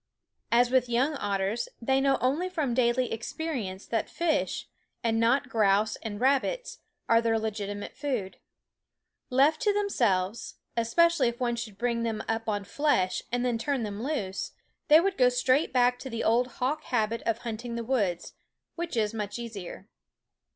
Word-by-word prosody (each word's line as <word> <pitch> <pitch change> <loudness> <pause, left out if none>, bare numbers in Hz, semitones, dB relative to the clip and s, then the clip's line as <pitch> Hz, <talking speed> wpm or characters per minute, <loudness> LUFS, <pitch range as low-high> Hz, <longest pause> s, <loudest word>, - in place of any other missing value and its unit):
As 240 +1 +4
with 255 -2 +3
young 255 +6 +2
otters, 200 +1 -1
they 265 +3 +2
know 275 0 +3
only 295 +9 +1
from 310 -9 -1
daily 245 0 +2
experience 225 -6 -4
that 225 -2 -2
fish, 330 -3 -1 0.4
and 225 -1 +1
not 245 +4 +3
grouse 215 -2 +2
and 210 -2 -6
rabbits, 280 - 0 0.3
are 230 0 +5
their 225 -1 +2
legitimate 205 -2 -4
food. 250 -10 -3 0.9
Left 280 +5 +3
to 420 - +3
themselves, 235 - 0 0.2
especially 265 +5 +3
if 235 0 -3
one 240 -2 0
should 220 -4 -6
bring 235 +1 0
them 225 -2 -2
up 225 0 -1
on 205 -1 -1
flesh 200 -6 +1
and 245 +1 0
then 240 -2 0
turn 275 0 -1
them 205 0 -4
loose, 205 -9 -3 0.3
they 310 0 +8
would 390 +3 0
go 250 -1 +6
straight 255 +4 +2
back 245 -1 +3
to 265 - -7
the 230 -2 -3
old 240 +3 +3
hawk 290 +5 -2
habit 230 -1 0
of 230 - +2
hunting 235 0 -5
the 235 - -3
woods, 210 -8 -1 0.4
which 340 -7 -4
is 215 -1 +1
much 210 -1 -4
easier. 205 -5 -7
235 Hz, 165 wpm, -28 LUFS, 220-270 Hz, 0.9 s, they